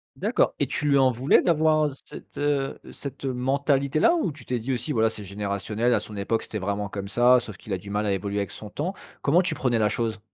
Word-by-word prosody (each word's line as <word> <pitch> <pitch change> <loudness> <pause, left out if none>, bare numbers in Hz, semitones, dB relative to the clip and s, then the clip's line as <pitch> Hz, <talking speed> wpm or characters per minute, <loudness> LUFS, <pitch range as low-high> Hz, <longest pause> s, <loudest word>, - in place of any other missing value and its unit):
D'accord, - - +1
et - - +2
tu 150 - -2
lui 140 - +5
en 130 -1 +5
voulais 125 +4 +4
d'avoir, 155 -2 +3
heu, - - -8
cette, - - -12
heu, 145 -1 0
cette 140 0 -7
mentalité-là? 140 - +2
Ou, 315 - 0
tu 150 - -13
t'es 125 - -1
dit 125 +4 -2
aussi, 125 +4 -3
voilà, 110 -4 +2
c'est 105 - -7
générationnel, 105 +4 -1
à - - +3
son 105 - -9
époque, 110 +3 0
c'était 110 - -5
vraiment 100 +1 -2
comme 100 0 -5
ça, 120 +4 +5
sauf 110 -4 -8
qu'il 110 - -11
a - - 0
du 100 +3 -10
mal 105 +1 0
à 100 - +1
évoluer 100 +1 -2
avec 100 -2 -2
son 105 - -9
temps? 180 +7 -3 0.3
Comment 170 +6 +4
tu 185 - 0
prenais 120 -3 0
la 105 -1 +3
chose? 110 0 -2
120 Hz, 245 wpm, -25 LUFS, 105-140 Hz, 0.3 s, lui